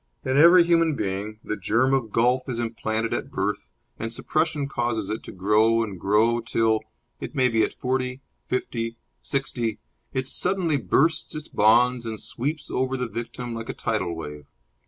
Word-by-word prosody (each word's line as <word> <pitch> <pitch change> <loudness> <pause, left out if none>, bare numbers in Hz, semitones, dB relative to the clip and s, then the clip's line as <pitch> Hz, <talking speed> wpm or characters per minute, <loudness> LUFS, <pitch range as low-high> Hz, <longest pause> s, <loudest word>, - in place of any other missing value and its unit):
In 130 - 0
every 170 +4 +8
human 165 -2 +3
being 100 0 -3
the - - -2
germ 120 +6 +2
of 125 -5 0
golf 125 +4 +2
is 120 - -2
implanted 115 -1 -2
at 135 - -3
birth, 105 -3 -2 0.3
and 115 0 -3
suppression 155 +3 0
causes 120 -6 -2
it 110 - -3
to - - -8
grow 110 +4 +3
and 100 -5 -6
grow 110 +5 +3
till 110 -1 +1 0.4
it - - -7
may 130 -2 +4
be 115 -1 +2
at - - 0
forty, 130 0 -2 0.3
fifty, 115 -2 -2 0.2
sixty 120 -5 -2 0.3
it 130 0 -2
suddenly 180 -2 +1
bursts 145 - +1
its 155 0 -7
bonds 120 +3 +4
and 110 -1 -4
sweeps 145 +5 -4
over 130 +1 0
the 125 -1 -2
victim 120 +2 -5
like 115 0 -6
a - - -4
tidal 95 -7 -1
wave. 75 -2 -8
120 Hz, 170 wpm, -25 LUFS, 110-130 Hz, 0.4 s, every